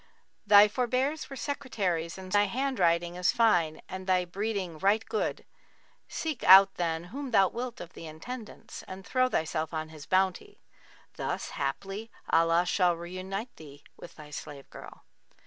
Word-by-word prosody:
Thy 205 0 +8
forbears 255 +7 -1
were 275 - -7
Secretaries 200 - -2
and 185 -1 -9
Scribes - - +3
and 205 -1 +4
thy - - -8
handwriting 175 -10 +1
is 180 0 +3
fine 175 -9 +2
and 185 0 -7
thy 185 -1 +2
breeding 190 -3 -3
right 205 +5 +2
good: 440 - -2 0.6
seek 315 -5 -4
out, 195 +1 +9
then, 165 -2 -2
whom 280 0 -5
thou 195 -5 +4
wilt 240 0 -5
of 175 0 -9
the - - -10
Intendants[FN#40] 215 +9 -9
and 185 0 -9
throw 255 +3 +2
thyself 160 -4 -2
on 155 0 -3
his 155 -2 -12
bounty; 185 -1 0 0.6
thus - - -3
haply 195 +11 -4 0.2
Allah 165 +1 +4
shall 180 -1 +2
reunite 185 +6 -6
thee 145 -2 -13
with - - -12
thy 150 -1 -12
slave 140 -1 -8
girl.' - - -12
185 Hz, 160 wpm, -29 LUFS, 165-225 Hz, 0.6 s, out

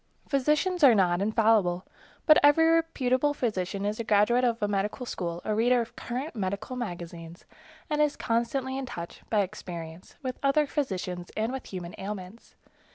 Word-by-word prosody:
Physicians 300 +6 +1
are 255 -5 +8
not 180 -2 +2
infallible, 215 -4 +2 0.4
but 310 - +7
every 290 +3 +6
reputable 295 -4 +2
physician 200 -5 -2
is 210 +2 -2
a - - -1
graduate 220 +4 +3
of 235 -2 +1
a 205 - 0
medical 205 +4 -2
school, 175 -6 -4
a 215 - 0
reader 245 +3 +3
of 235 -1 -4
current 255 +6 -5
medical 200 +4 -3
magazines, 175 -6 -7 0.4
and 300 -1 0
is 300 -1 +2
constantly 255 +3 -1
in 265 - -5
touch, 170 -6 -7
by 215 -2 +3
experience, 175 -4 -7
with 255 -1 -4
other 280 +2 +3
physicians 185 - -3
and 220 +2 0
with 265 - -6
human 180 -2 -6
ailments. 195 +2 -7
225 Hz, 160 wpm, -28 LUFS, 185-265 Hz, 0.4 s, are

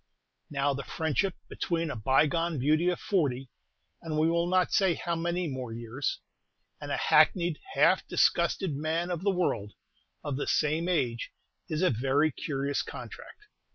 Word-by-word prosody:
Now, 140 0 0
the 140 - -4
friendship 165 +4 -1
between 165 -2 -2
a - - -4
bygone 150 +8 +2
beauty 155 +6 +2
of 180 - -1
forty 135 - -1 0.5
and 160 -2 -3
we 160 +2 +3
will 170 0 +1
not 185 0 +2
say 190 -4 +3
how 170 -1 -2
many 175 +1 -1
more 130 -4 -5
years 120 +4 -3 0.6
and - - -5
a - - 0
hackneyed, 170 +1 +3 0.2
half - - +4
disgusted 190 -6 +2
man 160 +4 -1
of 170 -2 -2
the 200 - +1
world, 170 - -1 0.5
of 140 -3 -3
the 145 - -3
same 160 +3 +1
age, 120 -10 0 0.4
is 155 +3 -1
a 185 - +4
very 135 +6 +2
curious 140 0 -2
contract. 420 - -10
155 Hz, 155 wpm, -29 LUFS, 135-175 Hz, 0.6 s, half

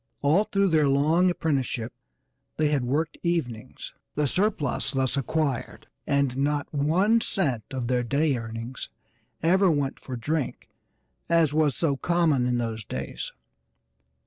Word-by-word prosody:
All 160 +9 +4
through 195 -1 +1
their 155 -4 +3
long 155 +6 +3
apprenticeship 135 -9 -1 0.6
they 155 -1 +2
had 145 -4 +1
worked 150 +6 -1
evenings; 150 -11 -3 0.2
the 150 - +1
surplus 180 - 0
thus 130 -1 0
acquired 140 -1 -2 0.2
and 140 -3 +1
not 145 +1 0
one 180 +11 +3
cent 130 - -1
of 130 -3 -3
their 125 0 +1
day 140 +4 +1
earnings 115 +2 -6 0.5
ever 190 +3 +4
went 145 -4 0
for 130 - -6
drink, 145 +3 -3 0.6
as 165 -3 +3
was 155 -2 +2
so 145 -5 0
common 160 -6 +2
in 125 -1 +1
those 115 -2 -3
days. 70 -7 -5
145 Hz, 135 wpm, -26 LUFS, 125-165 Hz, 0.6 s, All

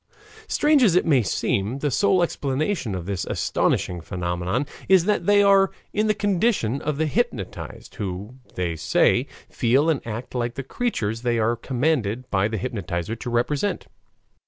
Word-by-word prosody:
Strange 300 -1 +3
as 205 -8 +5
it 180 - +3
may 140 -6 +4
seem, 105 +2 -1
the 145 0 -1
sole 190 +2 +3
explanation 140 - -1
of 90 -2 -5
this 95 -1 -2
astonishing 90 -1 0
phenomenon 90 - -2 0.2
is 190 -3 +6
that 210 0 0
they 205 0 +6
are 195 -1 +5 0.2
in 215 +1 +1
the 215 - +3
condition 195 - +1
of 150 -1 -2
the 160 - +1
hypnotized, 150 - -3
who, 100 +3 -5 0.2
they 90 -2 -1
say, 85 +2 +2 0.2
feel 135 +7 +2
and 145 - -1
act 115 +2 -6
like 120 -1 -2
the 135 - -4
creatures 115 - -2
they 120 -1 0
are 115 +1 +2
commanded 125 -2 -1
by 95 +1 +2
the 110 0 -3
hypnotizer 100 -3 -3
to 115 - -6
represent. 140 +10 0
125 Hz, 160 wpm, -23 LUFS, 105-170 Hz, 0.2 s, is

